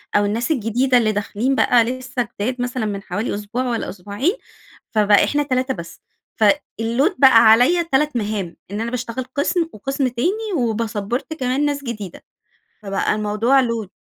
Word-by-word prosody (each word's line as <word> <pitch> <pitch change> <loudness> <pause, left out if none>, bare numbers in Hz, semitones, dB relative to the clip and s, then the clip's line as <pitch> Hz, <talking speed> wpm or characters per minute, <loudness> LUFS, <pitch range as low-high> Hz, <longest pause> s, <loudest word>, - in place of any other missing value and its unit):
أو 205 - +4
الناس 230 +7 -1
الجديدة 250 0 +2
اللي 220 -3 +2
داخلين 210 +6 -1
بقى 240 -2 +4
لسه 250 -1 -3
جداد 250 +4 -2
مثلًا 245 -1 -2
مِن 200 -2 -3
حوالي 205 +6 -3
أسبوع 210 +5 -3
والّا 235 -2 -2
أسبوعين، 205 - -2 0.6
فبقى 210 -2 +4
إحنا 295 0 +1
3 260 -1 -1
بس. 170 -5 -10 0.3
في 215 -3 +4 0.3
الload 265 - +1
بقى 260 -4 +7
عليَّ 255 +10 +4
3 300 -2 0
مهام. 205 -5 -3 0.2
إن 210 +2 -3
أنا 235 +1 -3
باشتغل 250 0 -4
قسم 325 +3 0
وقسم 270 +5 -2
تاني، 380 - -2
و 235 -4 0
باسبّورت 225 +5 -3
كمان 265 -1 -1
ناس 285 -1 -2
جديدة، 210 -8 -7 0.6
فبقى 195 -1 0
الموضوع 215 +6 +2
load 225 -4 -3
240 Hz, 165 wpm, -20 LUFS, 210-265 Hz, 0.6 s, بقى